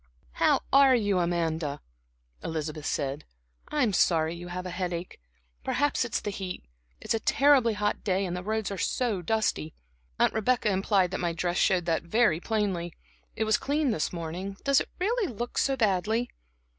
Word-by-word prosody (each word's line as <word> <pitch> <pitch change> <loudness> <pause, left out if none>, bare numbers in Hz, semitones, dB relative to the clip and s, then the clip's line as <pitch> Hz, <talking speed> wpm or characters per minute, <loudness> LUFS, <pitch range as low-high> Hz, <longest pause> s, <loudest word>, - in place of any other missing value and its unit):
"How - - +2
are 275 -1 +7
you, 205 -5 +1
Amanda?" 165 -4 -1 0.6
Elizabeth 155 -1 -4
said. 140 0 -2 0.4
"I'm 255 -9 +1
sorry 165 -2 +2
you 175 +1 -8
have 180 +1 -5
a 180 - -4
headache. 180 - -4 0.4
Perhaps 290 0 +1
it's 235 - -1
the 205 - -4
heat. 190 -2 -6 0.4
It's - - -2
a 225 - 0
terribly 265 -1 +4
hot 210 0 -1
day, 195 -1 +1
and 180 -1 -3
the 180 - -4
roads 215 +1 -2
are 195 - -4
so 230 -7 0
dusty. 175 -5 -1 0.4
Aunt - - +3
Rebecca 220 0 +1
implied 190 -1 +2
that 190 - -3
my 170 -1 -1
dress 175 +1 -1
showed 180 -3 +2
that 165 -1 +1
very 170 -1 +2
plainly. 190 -5 -2 0.4
It 220 - 0
was 220 -1 +3
clean 285 -1 0
this 160 - -1
morning 180 +4 -5
does 275 -1 +4
it - - -6
really 410 - 0
look 240 +2 -3
so 270 -1 +1
badly?" 220 +2 +1
195 Hz, 170 wpm, -28 LUFS, 175-225 Hz, 0.6 s, are